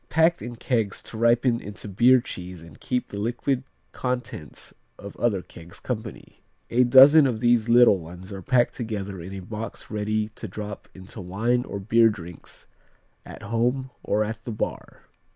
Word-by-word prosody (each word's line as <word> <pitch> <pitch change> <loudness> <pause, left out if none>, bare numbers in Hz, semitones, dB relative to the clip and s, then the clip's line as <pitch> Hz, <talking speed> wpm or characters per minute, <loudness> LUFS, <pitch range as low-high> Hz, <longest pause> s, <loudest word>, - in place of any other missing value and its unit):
Packed 165 +2 +3
in 120 0 -6
kegs 115 -4 -2
to - - -11
ripen 120 +1 +3
into 105 0 -9
beer 120 +6 +5
cheese 90 -5 -8
and 85 0 -15
keep 125 -1 -2
the 100 - -6
liquid 120 +4 -1 0.3
contents 125 - -5 0.2
of 100 0 -10
other 100 -6 0
kegs 85 +1 -14
company. 110 -4 -7 0.3
A 125 +2 +4
dozen 135 +4 +8
of 115 -4 -2
these 120 -1 +2
little 120 -4 +6
ones 90 +4 -10
are 95 - -7
packed 120 +4 +2
together 100 -6 -5
in 90 +3 -8
a 95 -1 -6
box 110 +4 -8
ready 105 0 -1
to 110 +1 -9
drop 105 +1 -7
into 95 +3 -10
wine 115 +7 0
or 100 - -5
beer 115 +3 +4
drinks 90 -5 -10 0.6
at - - -10
home 125 +5 -1
or 105 +1 +1
at 110 +1 -6
the 120 - -5
bar. 105 - -5
110 Hz, 170 wpm, -25 LUFS, 100-120 Hz, 0.6 s, dozen